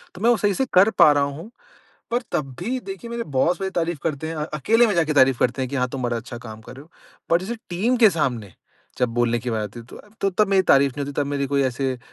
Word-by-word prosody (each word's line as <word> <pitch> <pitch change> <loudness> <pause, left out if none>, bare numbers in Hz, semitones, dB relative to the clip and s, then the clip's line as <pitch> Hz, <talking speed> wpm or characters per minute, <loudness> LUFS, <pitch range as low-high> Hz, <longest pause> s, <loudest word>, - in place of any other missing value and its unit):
तो 180 - -10
मैं 230 - +3
वो 240 - +4
सही 205 -1 +1
से 265 - 0
कर 190 +4 +6
पा 150 - +8
रहा 145 -1 +2
हूँ। 145 +8 -5 0.6
पर 240 +2 0
तब 135 -3 -2
भी 245 +8 -2
देखिए 385 -12 -7
मेरे 235 0 -3
बॉस 160 +5 0
मेरी 190 0 -2
तारीफ 170 -3 -2
करते 160 -1 -2
हैं। 165 - -4
अ, 150 - -2
अकेले 225 - +3
में 210 - 0
जाके 160 -3 +1
तारीफ 130 -2 +4
करते 130 +2 0
हैं 130 - -2
कि 140 - -3
हाँ, 125 -1 0
तुम 130 0 -5
बड़ा 120 -1 -1
अच्छा 120 +1 -7
काम 110 -2 -10
कर 115 - -12
रहे 135 - -11
हो। 160 - -21 0.4
पर 170 +1 +4
जैसे 230 +5 -5
टीम 215 +9 +1
के 225 -3 +6
सामने 120 - -2 0.5
जब 125 - +2
बोलने 120 0 0
की 125 - -4
बात 110 -2 -1
आती 105 +3 -7
है 115 - -14 0.3
तो 195 - +1
तब 200 +2 +1
मेरी 195 -1 +3
तारीफ 140 -5 +4
नहीं 145 - -2
होती 145 - -5
तब 145 - 0
मेरी 140 -1 -1
कोई 140 0 +1
ऐसे 130 0 -2
145 Hz, 275 wpm, -22 LUFS, 130-195 Hz, 0.6 s, पा